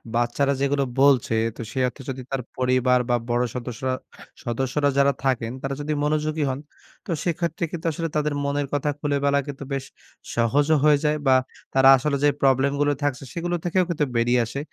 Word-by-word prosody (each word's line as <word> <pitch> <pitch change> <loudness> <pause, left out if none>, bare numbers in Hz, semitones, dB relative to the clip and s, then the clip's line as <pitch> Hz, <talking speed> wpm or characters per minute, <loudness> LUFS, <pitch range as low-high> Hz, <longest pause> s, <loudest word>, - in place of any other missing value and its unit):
বাচ্চারা 120 +4 +1
যেগুলো 140 0 +1 0.2
বলছে 135 -5 +4 0.2
তো - - -7
সে 130 - -3
অর্থে 135 - -8
যদি 130 0 -4
তার 135 -1 -1 0.2
পরিবার 125 0 +3
বা 120 - +4
বড় 120 +1 +2
সদস্যরা 125 +1 -3 0.5
সদস্যরা 135 +4 0
যারা 140 0 +4
থাকেন 120 -3 0
তারা 135 0 -3
যদি 150 +1 -2
মনোযোগী 155 0 0
হন, 130 +1 -3 0.5
তো 180 - -4
সেক্ষেত্রে 170 -1 -2
কিন্তু 170 0 -6
আসলে 165 +2 -3
তাদের 150 -1 +1
মনের 140 0 -1
কথা 145 +1 0
খুলে 145 -1 0
বলা 140 0 +3
কিন্তু 140 0 -6
বেশ 135 -1 -3 0.5
সহজও 140 +7 +3
হয়ে 150 -1 +6
যায় 150 0 +2
বা 130 - +6 0.4
তারা 135 0 +6
আসলে 140 +2 0
যে 145 - +6
প্রবলেমগুলো 140 +2 +3
থাকছে, 140 -2 -1
সেগুলো 175 +1 -2
থেকেও 185 +1 +2
কিন্তু 150 -3 0
বেরিয়ে 120 +1 +3
আসে? 130 +5 -5
140 Hz, 180 wpm, -24 LUFS, 130-150 Hz, 0.5 s, হয়ে